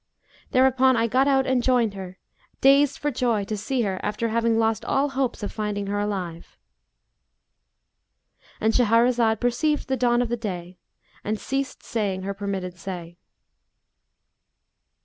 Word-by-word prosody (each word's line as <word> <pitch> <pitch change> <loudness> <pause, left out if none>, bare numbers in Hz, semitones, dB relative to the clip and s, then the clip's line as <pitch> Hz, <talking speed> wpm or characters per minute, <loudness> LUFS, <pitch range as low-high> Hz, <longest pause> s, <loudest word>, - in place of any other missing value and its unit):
Thereupon 260 0 +4
I 225 - +2
got 255 +4 +2
out 270 -1 +3
and 260 -1 +1
joined 240 -4 +2
her, 190 -1 -8 0.4
dazed 275 +1 +4
for 295 - -1
joy 235 -5 0
to 215 +2 -4
see 245 +4 -1
her 190 -3 -2
after 210 +2 -2
having 230 0 +1
lost 225 -1 +1
all 280 +2 +1
hopes 265 -4 -2
of 205 - -3
finding 210 -2 -3
her 205 +1 -2
alive.'" 185 -5 -4 2.0
—And 220 +1 +1
Shahrazad 230 -1 +3
perceived 295 +5 0
the 265 - +1
dawn 240 0 +2
of 240 - -4
day 180 -4 -6 0.4
and 215 +1 -2
ceased 270 +3 -3
saying 200 -5 -2
her 200 +1 -3
permitted 190 -3 -5
say. 175 -2 -7
225 Hz, 140 wpm, -24 LUFS, 200-255 Hz, 2.0 s, Thereupon